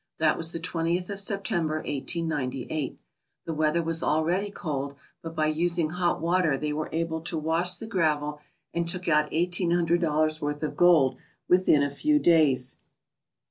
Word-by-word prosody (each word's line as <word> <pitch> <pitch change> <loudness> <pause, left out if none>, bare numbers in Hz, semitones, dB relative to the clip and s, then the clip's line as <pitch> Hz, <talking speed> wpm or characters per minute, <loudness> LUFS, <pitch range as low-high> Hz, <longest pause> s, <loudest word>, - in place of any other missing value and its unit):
That 155 -1 +3
was 165 0 -1
the 165 - -3
twentieth 175 +2 -2
of 200 - -3
September, 190 -6 -1
1898. 145 -2 -3 0.5
The 165 - -3
weather 155 +2 +1
was 165 0 0
already 175 +6 +1
cold, 140 -7 -4 0.3
but 165 0 -8
by 155 - +1
using 165 +1 +1
hot 175 0 0
water 165 -3 +1
they 150 +1 -2
were 155 +1 -3
able 160 0 -2
to 165 0 -3
wash 165 +3 +1
the 225 - -6
gravel, 150 -7 0 0.3
and 170 0 -1
took 180 +1 -2
out 150 -2 +3
eighteen 175 +2 +1
hundred 170 0 +2
dollars' 155 -1 +1
worth 145 +1 -3
of 155 - -3
gold 155 -7 +4 0.3
within 180 -5 +4
a 140 - 0
few 300 - +2
days. 150 - +3
165 Hz, 165 wpm, -26 LUFS, 150-175 Hz, 0.5 s, gold